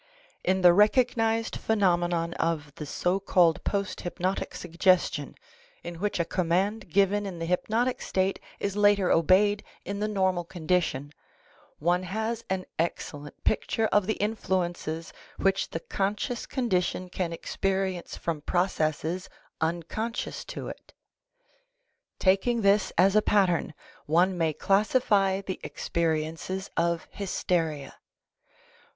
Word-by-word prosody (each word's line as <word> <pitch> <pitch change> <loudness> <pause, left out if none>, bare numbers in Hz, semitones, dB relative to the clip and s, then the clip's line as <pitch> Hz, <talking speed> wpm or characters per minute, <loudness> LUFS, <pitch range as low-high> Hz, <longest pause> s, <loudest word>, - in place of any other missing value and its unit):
In 190 +1 +1
the 175 - +9
recog 215 +7 +4
nized 225 0 0
phenomenon 175 -5 +1
of 155 -3 -1
the 150 - -7
so 180 +6 0
called 175 -4 +3
post 200 -1 -2
hypnotic 180 +2 -2
suggestion, 180 +2 +1 0.5
in 170 -1 -7
which 205 -1 -1
a 170 - +2
command 185 +5 0
given 200 +3 +2
in 185 -3 -6
the 165 - -3
hypnotic 225 +8 0
state 190 +1 0 0.2
is 200 -1 -2
later 205 -2 +4
obeyed 200 +5 +4 0.2
in 200 0 -4
the 210 - 0
normal 190 -4 +1
condition, 165 -5 -1 0.6
one 175 +3 +1
has 220 +5 -3
an 185 -1 -1
excellent 145 -3 -4
picture 220 +1 +1
of 205 -2 +3
the 220 - +1
influences 175 -6 -2 0.2
which 195 0 +1
the 165 - -4
conscious 205 +7 -2
condition 185 -7 -1
can 180 -1 -3
experience 190 +1 -2
from 160 -3 -3
processes 175 0 -1 0.3
unconscious 170 +8 -2
to - - -6
it; - - -10 1.2
taking 200 +5 +2
this 200 -1 +3
as 190 +3 +5
a 215 - +6
pattern, 190 -5 +2 0.4
one 175 +5 +3
may 165 -2 +1
classify 195 - +2
the 190 -1 -5
experiences 165 +3 -2
of 170 0 0
hysteria. 165 -7 -2
185 Hz, 120 wpm, -27 LUFS, 170-205 Hz, 1.2 s, the